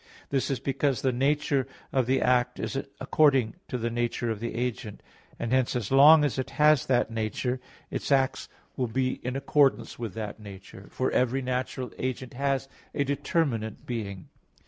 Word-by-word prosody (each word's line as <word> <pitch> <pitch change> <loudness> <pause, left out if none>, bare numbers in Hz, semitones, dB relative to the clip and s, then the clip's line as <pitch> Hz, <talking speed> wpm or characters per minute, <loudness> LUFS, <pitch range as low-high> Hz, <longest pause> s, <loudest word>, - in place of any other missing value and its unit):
This 135 0 0
is 135 - -1
because 135 -2 0
the 130 - +3
nature 135 +1 +1 0.3
of 130 -3 +2
the 130 +1 +2
act 125 -1 +2
is - - -3 0.2
according 135 -7 +3
to 125 - -3
the 115 0 -2
nature 120 0 -1
of 110 - -4
the 115 0 -4
agent; 115 -4 -4 0.3
and 115 - -3
hence 130 -1 +2
as 120 -3 -2
long 150 +3 +8
as 130 -4 -1
it 130 - -2
has 150 -2 +5
that 120 -3 +2
nature, 115 +3 -2 0.3
its - - -3
acts 135 -1 +2 0.3
will 125 - -1
be 130 +3 -1
in 125 +1 -3
accordance 140 -2 +2
with 115 -4 -5
that 110 -1 -5
nature; 100 -1 -11
for 130 - -1
every 130 +2 +1
natural 125 0 -3
agent 130 -1 -3
has 135 +1 -1 0.3
a 140 - +2
determinate 135 - -1
being. 100 -7 -5
125 Hz, 170 wpm, -27 LUFS, 115-135 Hz, 0.3 s, long